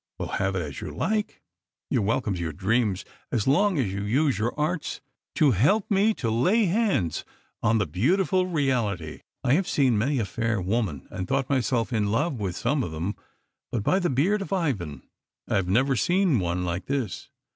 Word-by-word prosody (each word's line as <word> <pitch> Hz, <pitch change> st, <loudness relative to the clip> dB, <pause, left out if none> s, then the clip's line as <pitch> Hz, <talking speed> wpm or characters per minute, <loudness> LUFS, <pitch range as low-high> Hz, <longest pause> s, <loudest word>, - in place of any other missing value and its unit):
Well, -, -, -4 dB
have 95 Hz, 0 st, -1 dB
it 90 Hz, -, -1 dB
as 70 Hz, -3 st, -7 dB
you -, -, -5 dB
like. 215 Hz, -1 st, -2 dB, 0.5 s
You -, -, +3 dB
are 100 Hz, -, 0 dB
welcome 105 Hz, -1 st, 0 dB
to 90 Hz, -, -4 dB
your 80 Hz, -2 st, -3 dB
dreams 105 Hz, 0 st, 0 dB, 0.3 s
as 110 Hz, -, 0 dB
long 185 Hz, +7 st, +3 dB
as 110 Hz, -9 st, 0 dB
you 100 Hz, -, -3 dB
use 130 Hz, +7 st, +1 dB
your 115 Hz, +3 st, +1 dB
arts 155 Hz, +2 st, -1 dB, 0.4 s
to 150 Hz, -3 st, +4 dB
help 185 Hz, -, +2 dB
me 205 Hz, +2 st, +3 dB
to 115 Hz, -3 st, -2 dB
lay 185 Hz, -, +3 dB
hands 185 Hz, -, +1 dB, 0.4 s
on 115 Hz, +2 st, +3 dB
the 105 Hz, -, +1 dB
beautiful 180 Hz, -, +1 dB
reality. 120 Hz, -, -1 dB, 0.2 s
I 130 Hz, -, +3 dB
have 180 Hz, +5 st, +2 dB
seen 130 Hz, -7 st, +2 dB
many 140 Hz, +6 st, +1 dB
a 115 Hz, -, 0 dB
fair 115 Hz, +1 st, -1 dB
woman, 95 Hz, -, -2 dB
and 95 Hz, -, -4 dB
thought 135 Hz, 0 st, 0 dB
myself 125 Hz, -2 st, +1 dB
in 105 Hz, -3 st, +1 dB
love 140 Hz, +3 st, 0 dB
with 95 Hz, -4 st, -2 dB
some 145 Hz, -1 st, 0 dB
of 100 Hz, -, -2 dB
them, 85 Hz, +6 st, -3 dB, 0.6 s
but 115 Hz, -4 st, -1 dB
by 185 Hz, -, +3 dB
the 175 Hz, -, 0 dB
beard 180 Hz, +11 st, +2 dB
of 195 Hz, -, -6 dB
Ivan, 105 Hz, -, -2 dB, 0.4 s
I -, -, +1 dB
have 95 Hz, -2 st, 0 dB
never 130 Hz, +8 st, +2 dB
seen 175 Hz, -, +2 dB
one 90 Hz, 0 st, -1 dB
like 90 Hz, +1 st, -3 dB
this. 130 Hz, -8 st, -3 dB
120 Hz, 200 wpm, -26 LUFS, 100-155 Hz, 0.6 s, to